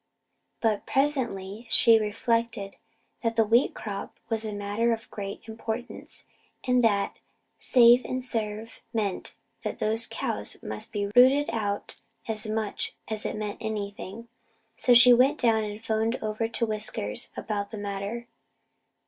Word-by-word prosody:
But 220 Hz, -3 st, 0 dB
presently 235 Hz, -7 st, -1 dB
she 230 Hz, -1 st, +6 dB
reflected 220 Hz, -1 st, -1 dB, 0.4 s
that 230 Hz, -1 st, 0 dB
the 225 Hz, -, +5 dB
wheat 235 Hz, +5 st, +3 dB
crop 200 Hz, -2 st, -6 dB
was 225 Hz, -1 st, -1 dB
a 215 Hz, -, -3 dB
matter 205 Hz, +3 st, 0 dB
of 225 Hz, 0 st, -7 dB
great 200 Hz, -1 st, -6 dB
importance 225 Hz, +2 st, -6 dB, 0.4 s
and 250 Hz, -1 st, +3 dB
that 205 Hz, -3 st, +2 dB, 0.4 s
'save 245 Hz, 0 st, +6 dB
and 255 Hz, 0 st, -3 dB
serve' 220 Hz, -2 st, -4 dB
meant 205 Hz, -5 st, -2 dB, 0.3 s
that -, -, -3 dB
those 225 Hz, +2 st, 0 dB
cows 105 Hz, 0 st, -3 dB
must 105 Hz, 0 st, -5 dB
be 205 Hz, -2 st, -1 dB
routed 265 Hz, +4 st, +6 dB
out 205 Hz, -3 st, -3 dB, 0.3 s
as 220 Hz, -1 st, -2 dB
much 215 Hz, -1 st, -3 dB
as 220 Hz, -1 st, -2 dB
it -, -, -4 dB
meant 210 Hz, -1 st, -4 dB
anything. 210 Hz, 0 st, -5 dB, 0.5 s
So 245 Hz, -, +4 dB
she 245 Hz, +1 st, +9 dB
went 265 Hz, +5 st, +4 dB
down 225 Hz, -4 st, +3 dB
and 210 Hz, +1 st, -6 dB
phoned 220 Hz, +2 st, +1 dB
over 215 Hz, +1 st, -2 dB
to 230 Hz, +1 st, 0 dB
Whiskers 210 Hz, -, 0 dB
about 205 Hz, -2 st, -3 dB
the 220 Hz, -, -7 dB
matter. 205 Hz, +3 st, -4 dB
220 Hz, 140 wpm, -27 LUFS, 205-235 Hz, 0.5 s, she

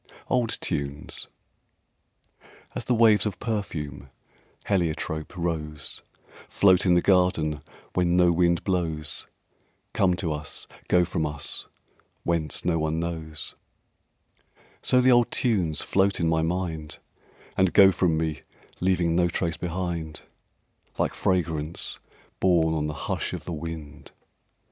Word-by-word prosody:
Old 120 Hz, -3 st, +1 dB
Tunes 70 Hz, -3 st, -3 dB, 1.5 s
As -, -, -4 dB
the 125 Hz, -, +2 dB
waves 110 Hz, -3 st, +5 dB
of 105 Hz, -, -4 dB
perfume, 80 Hz, -, -4 dB, 0.6 s
heliotrope, 80 Hz, -3 st, -1 dB
rose, 75 Hz, -4 st, -3 dB, 0.5 s
Float 95 Hz, -1 st, +4 dB
in 90 Hz, -, +5 dB
the 85 Hz, -, +3 dB
garden 90 Hz, -6 st, +2 dB, 0.3 s
when 90 Hz, -1 st, +2 dB
no 90 Hz, -1 st, +5 dB
wind 85 Hz, 0 st, +2 dB
blows, 80 Hz, -5 st, -2 dB, 0.7 s
Come 90 Hz, -3 st, +3 dB
to 85 Hz, -2 st, -1 dB
us, 75 Hz, 0 st, -6 dB, 0.2 s
go 90 Hz, -1 st, +4 dB
from 80 Hz, -2 st, -1 dB
us, 75 Hz, -1 st, -4 dB, 0.6 s
whence 80 Hz, -3 st, -1 dB
no 85 Hz, -2 st, +2 dB
one 80 Hz, +1 st, 0 dB
knows; 80 Hz, -2 st, -4 dB, 1.3 s
So 125 Hz, -, +4 dB
the 130 Hz, +1 st, +5 dB
old 120 Hz, -1 st, +5 dB
tunes 90 Hz, -, +1 dB
float 100 Hz, 0 st, +2 dB
in 85 Hz, -, +1 dB
my 80 Hz, 0 st, +2 dB
mind, 80 Hz, -2 st, -3 dB, 0.6 s
And 95 Hz, -1 st, +3 dB
go 95 Hz, -1 st, +8 dB
from 90 Hz, -3 st, +1 dB
me 80 Hz, -3 st, -2 dB, 0.4 s
leaving 90 Hz, -2 st, +2 dB
no 90 Hz, 0 st, +4 dB
trace 85 Hz, -1 st, -1 dB
behind, 85 Hz, -3 st, -3 dB, 0.8 s
Like -, -, 0 dB
fragrance 80 Hz, -3 st, -1 dB, 0.4 s
borne 85 Hz, -3 st, +3 dB
on 75 Hz, -1 st, 0 dB
the 75 Hz, -, -4 dB
hush -, -, -2 dB
of -, -, -6 dB
the 90 Hz, -, -4 dB
wind. 80 Hz, -2 st, -7 dB
85 Hz, 125 wpm, -26 LUFS, 80-90 Hz, 1.5 s, go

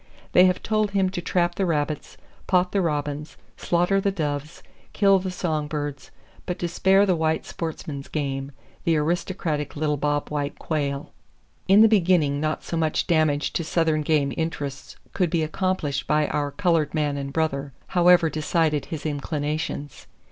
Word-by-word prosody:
They 180 Hz, -, +7 dB
have 185 Hz, 0 st, +1 dB
told 215 Hz, -1 st, +1 dB
him 190 Hz, -1 st, +2 dB
to 180 Hz, -, -4 dB
trap 175 Hz, 0 st, +1 dB
the 190 Hz, +2 st, -1 dB
rabbits, 150 Hz, -2 st, -2 dB, 0.3 s
pot 180 Hz, -1 st, +2 dB
the 200 Hz, -, +1 dB
robins, 150 Hz, -2 st, -2 dB, 0.2 s
slaughter 180 Hz, +3 st, +1 dB
the 200 Hz, -, +1 dB
doves, 150 Hz, -4 st, -4 dB, 0.3 s
kill 195 Hz, -1 st, +4 dB
the 185 Hz, 0 st, -4 dB
song 160 Hz, -5 st, -2 dB
birds, 145 Hz, -2 st, -5 dB, 0.4 s
but 180 Hz, -, -2 dB
to 175 Hz, -, -2 dB
spare 190 Hz, +3 st, +4 dB
the 185 Hz, -3 st, +2 dB
white 160 Hz, -1 st, 0 dB
sportsman's 150 Hz, -4 st, -5 dB
game, 135 Hz, -2 st, -3 dB, 0.3 s
the 165 Hz, -2 st, +2 dB
aristocratic 155 Hz, -1 st, -1 dB
little 150 Hz, 0 st, 0 dB
bobwhite 145 Hz, 0 st, -1 dB
quail. 140 Hz, -3 st, -3 dB, 0.6 s
In 195 Hz, +3 st, +7 dB
the 225 Hz, -, +8 dB
beginning 170 Hz, -9 st, +3 dB
not 155 Hz, 0 st, -1 dB
so -, -, -4 dB
much 160 Hz, -2 st, 0 dB
damage 155 Hz, -4 st, +1 dB
to 170 Hz, -, -1 dB
southern 160 Hz, -1 st, +1 dB
game 145 Hz, -2 st, +1 dB
interests 145 Hz, -4 st, -4 dB, 0.2 s
could 180 Hz, -4 st, +1 dB
be 165 Hz, -1 st, +1 dB
accomplished 160 Hz, -3 st, -1 dB
by 150 Hz, +1 st, +3 dB
our 145 Hz, -1 st, -1 dB
colored 165 Hz, 0 st, +1 dB
man 150 Hz, -2 st, 0 dB
and 140 Hz, -1 st, -4 dB
brother, 140 Hz, -2 st, -1 dB, 0.2 s
however 175 Hz, -1 st, +5 dB
decided 155 Hz, -1 st, 0 dB
his 160 Hz, -2 st, -6 dB
inclinations. 145 Hz, -1 st, -3 dB
155 Hz, 160 wpm, -24 LUFS, 145-180 Hz, 0.6 s, the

